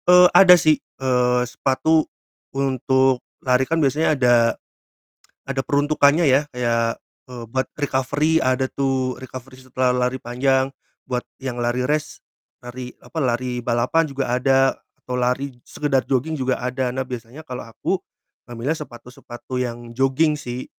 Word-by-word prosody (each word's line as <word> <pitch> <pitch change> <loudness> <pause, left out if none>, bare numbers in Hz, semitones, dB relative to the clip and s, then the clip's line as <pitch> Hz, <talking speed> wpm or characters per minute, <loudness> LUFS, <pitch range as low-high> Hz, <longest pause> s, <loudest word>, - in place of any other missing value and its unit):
Eee, 180 0 +9
ada 180 -2 +9
sih, 155 -2 +3
eee, 125 -1 0
sepatu 135 +6 +1 0.5
untuk 130 -1 +2 0.2
lari 130 0 +2
kan 165 - +1
biasanya 155 +1 +2
ada 125 -2 +4 1.1
ada 135 -1 -2
peruntukannya 145 +2 +3
ya, 135 +3 +3
kayak, 115 -2 0 0.3
eee, 125 -2 -8
buat 130 +2 -1
recovery 145 +3 0
ada 130 +1 +1
tuh, 130 -2 -1
recovery 130 0 -10
setelah 130 0 -1 0.2
lari 130 +1 -5
panjang, 130 +2 +1 0.4
buat 125 -1 -2 0.2
yang 130 -2 -4
lari 120 +1 0
race, 150 0 -2 0.4
lari 125 0 -8
apa, - - -11
lari 125 -2 -1
balapan 120 +7 +2
juga 135 -2 -3
ada, 135 +2 +3 0.3
atau 125 0 -4
lari 125 +3 0 0.2
sekedar 140 -3 0
jogging 140 +5 0
juga 130 0 -1
ada, 125 0 -2
nah 130 - -1
biasanya 125 +3 -8
kalo 130 -5 -7
aku, 115 - -2 0.5
ngambilnya 120 +7 -3
sepatu-sepatu 125 -2 -9
yang 120 -1 -4
jogging 135 +5 +1
sih. 125 -2 -5
130 Hz, 140 wpm, -22 LUFS, 125-140 Hz, 1.1 s, Eee